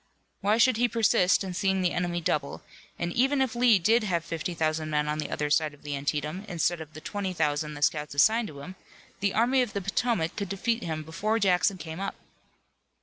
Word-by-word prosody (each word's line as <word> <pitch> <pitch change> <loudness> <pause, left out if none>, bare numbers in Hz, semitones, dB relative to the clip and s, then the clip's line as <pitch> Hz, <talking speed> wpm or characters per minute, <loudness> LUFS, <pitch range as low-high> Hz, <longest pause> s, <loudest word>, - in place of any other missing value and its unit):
Why 205 +2 +2
should 235 0 +4
he 245 +1 +3
persist 215 -6 +3
in 190 -2 -5
seeing 190 0 0
the 175 - +2
enemy 175 -1 -1
double, 145 -3 -2 0.3
and 170 0 -3
even 270 +3 +2
if 260 -4 +1
Lee 240 -3 +5
did 220 +6 +3
have 170 -5 -1
fifty 165 +1 -4
thousand 155 -1 -1
men 150 -1 0
on 150 +1 -2
the 150 - -3
other 150 0 -2
side 155 -1 +2
of - - -25
the 145 -1 -3
Antietam, 150 +6 -3
instead 175 0 0
of 155 -1 -11
the 155 - -8
twenty 200 0 -3
thousand 150 -2 -1
the 145 - -4
scouts 150 -2 0
assigned 220 +10 +4
to 140 -5 -10
him, 185 +6 -8 0.5
the 200 0 0
Army 250 +4 +3
of 240 -5 -2
the 200 - -2
Potomac 195 -3 -1
could 200 -3 -4
defeat 230 +4 -1
him 160 -4 -4
before 210 +8 -1
Jackson 190 -2 +2
came 160 0 -7
up. 195 - -3
180 Hz, 215 wpm, -27 LUFS, 155-215 Hz, 0.5 s, Lee